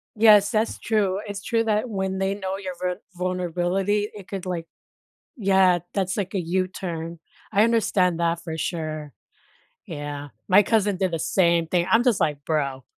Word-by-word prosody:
Yes, 210 -2 +6
that's 220 +1 0
true. 200 -4 +1
It's 200 -1 -6
true 230 -1 +1
that 215 +2 0
when 190 -2 -2
they 195 +1 0
know 190 -1 -3
your 190 -2 -5
ver 180 +2 -2
vulnerability, 185 +3 -1
it 200 -3 -10
could, 195 -2 -5
like 175 -3 -3 0.7
yeah, 190 -5 +4 0.2
that's, 190 -2 -1
like, 195 0 -3
a 190 - +1
U-turn. 170 -2 -3 0.3
I 205 +2 +5
understand 190 -7 +2
that 170 0 0
for 160 -1 -5
sure. 155 -3 -4 0.7
Yeah. 145 -4 -6 0.2
My 200 +2 +6
cousin 205 -2 +1
did 190 -1 +1
the 165 - -1
same 170 -1 +2
thing 175 0 +1
I'm 225 +4 +5
just 245 -6 +2
like, 145 -2 0
"Bro." 140 -4 -1
185 Hz, 165 wpm, -24 LUFS, 170-205 Hz, 0.7 s, Yes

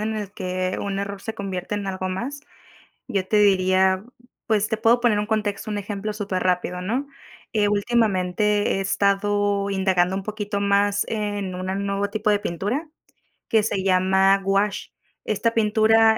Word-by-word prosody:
en 220 +1 -2
el 205 -2 -5
que 185 -1 -2
un 200 -1 -2
error 200 0 -5
se 225 - -5
convierte 190 0 -4
en 200 -1 -3
algo 185 0 -3
más. 250 +10 -4 0.7
Yo 190 -2 -1
te 210 - +2
diría, 190 -1 +3 0.4
pues, 215 -2 +1
te 220 - 0
puedo 230 +2 +3
poner 235 -4 +3
un 210 - 0
contexto, 215 -1 -2
un 205 - -2
ejemplo 205 +1 -4
súper 200 -3 -3
rápido, 180 0 0
¿no?, 250 +9 -2 0.5
eh, 205 -1 +3
últimamente 205 -2 +1
he - - -1
estado 200 +1 +1
indagando 190 -1 +1
un 195 - -3
poquito 210 -1 -4
más 200 0 +2
en 205 -4 -3
una 185 +1 -3
nuevo 200 0 -1
tipo 215 -1 0
de 205 - +3
pintura 205 - -3 0.6
que 220 -1 +3
se 205 -3 -1
llama 190 +1 +4
gouache, 195 +1 0 0.3
esta 220 +2 0
pintura, 220 0 +4
200 Hz, 165 wpm, -23 LUFS, 190-215 Hz, 0.7 s, llama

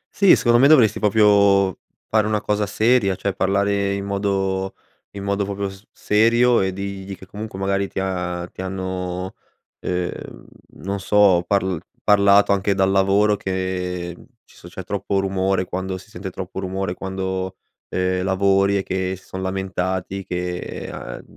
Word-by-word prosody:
Sì 200 -2 +6
secondo 120 -1 +3
me 140 - +7
dovresti 125 -9 +5
proprio 100 -2 +4 0.3
fare 110 -1 +2
una 105 -1 +1
cosa 105 0 -1
seria, 110 -2 +2
cioè 100 +1 -2
parlare 100 +1 +1
in 100 0 -4
modo 95 -1 -1 0.4
in 100 - -6
modo, 100 0 0
proprio 100 0 -3
z 95 +2 -16
serio 115 +3 +3
e 95 0 0
digli 100 0 -6
che 95 - -13
comunque, 105 +1 -8
magari, 100 0 0
ti - - -5
ha 90 -2 -3
ti - - -7
hanno, 95 -1 -4 0.5
uhm, 90 -1 -2 0.6
non 100 +1 -4
so, 100 -3 +4
parl 95 -4 +1 0.2
parlato 100 -1 +5
anche 100 0 +1
dal 95 0 +2
lavoro 100 +2 +3
che, 90 -2 -3
mhmm, - - -16 0.2
ci - - -22
so - - -13
c'è 95 +2 -8
troppo 100 +1 -2
rumore 95 -1 0
quando 95 +1 -4
si 110 +3 -15
sente 95 +2 -6
troppo 95 +1 -6
rumore 95 -1 -3
quando, 95 0 -4 0.3
ehm, 90 0 0
lavori 100 +1 +2
e 95 - -1
che 95 0 -2
si 95 - -20
son 95 - -6
lamentati 95 0 -3
che, 90 -1 -3 0.3
ehm, - - -7
a - - -8
95 Hz, 165 wpm, -21 LUFS, 95-100 Hz, 0.6 s, me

